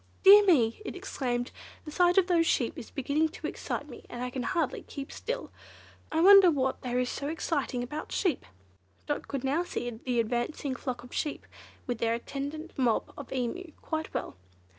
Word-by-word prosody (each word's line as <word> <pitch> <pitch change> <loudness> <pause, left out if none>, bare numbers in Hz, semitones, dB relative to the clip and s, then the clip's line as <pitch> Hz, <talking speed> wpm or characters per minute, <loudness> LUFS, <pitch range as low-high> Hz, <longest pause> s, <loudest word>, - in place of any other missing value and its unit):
"Dear 405 +2 +10
me!" 255 - +3
it - - -6
exclaimed, 250 -10 -2 0.3
"the 305 - -7
sight 355 +3 +3
of 380 - +6
those 340 -3 +3
sheep 240 - +1
is - - -8
beginning 290 +4 0
to - - -9
excite 290 - -4
me, 245 - -11
and 245 0 -5
I 250 - -3
can 255 - -3
hardly 330 0 -1
keep 275 0 -8
still! - - -4 0.6
I 320 - +2
wonder 390 0 +9
what 265 -4 0
there 250 -1 -2
is 250 0 +1
so 280 +3 -4
exciting 290 -5 -1
about 300 +5 -6
sheep!" 355 -9 0 0.6
Dot 290 - -3
could 275 -2 -3
now 285 +6 +1
see 245 - -4
the 240 +1 -2
advancing 240 +4 -1
flock 250 -1 -4
of 245 - -13
sheep, 300 - -2 0.4
with 245 -3 -3
their 230 0 +1
attendant 285 +6 -6
mob 240 -4 +1
of 280 - -9
Emu, 280 +7 -3
quite 315 -1 -4
well. - - -4
280 Hz, 185 wpm, -29 LUFS, 245-330 Hz, 0.6 s, Dear